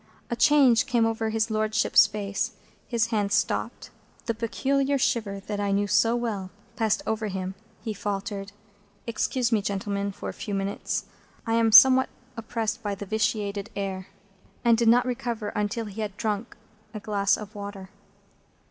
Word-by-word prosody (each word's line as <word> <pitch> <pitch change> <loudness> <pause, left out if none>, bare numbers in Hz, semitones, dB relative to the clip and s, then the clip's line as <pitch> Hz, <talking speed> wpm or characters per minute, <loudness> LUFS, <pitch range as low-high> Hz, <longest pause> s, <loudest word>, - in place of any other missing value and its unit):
A - - +1
change 275 -3 +5
came 240 -3 +2
over 225 0 -1
his 220 0 0
Lordship's 215 0 +4
face; 205 -1 -3 0.3
his 230 -2 0
hand 205 -2 +1
stopped; 215 - -1 0.3
the 230 - 0
peculiar 275 +5 0
shiver, 210 -6 -1
that 205 +1 -5
I 200 -1 0
knew 200 +1 +2
so 230 +3 +3
well, 215 -6 -3 0.3
passed 220 -4 0
over 220 0 -1
him; 190 -1 -4 0.3
he 220 - -3
faltered, 200 0 -4 0.5
"Excuse 245 +1 -1
me, 220 -2 +3
gentlemen, 200 0 -2
for - - -8
a - - -6
few 210 -3 -5
moments. 195 +1 -2 0.4
I 225 - -1
am 230 -1 +3
somewhat 260 +3 +8 0.3
oppressed 230 0 -3
by 205 -2 -2
the 200 - -7
vitiated 205 -1 -1
air;" 190 -2 -4 0.6
and 235 -1 +6
did 230 0 +1
not 240 +2 +5
recover 240 -3 -3
until 210 +3 -2
he 210 +1 -6
had 205 -2 -4
drunk 215 +1 -3 0.4
a - - -3
glass 200 -1 +1
of 210 0 -9
water. 200 -2 -8
215 Hz, 160 wpm, -26 LUFS, 200-230 Hz, 0.6 s, somewhat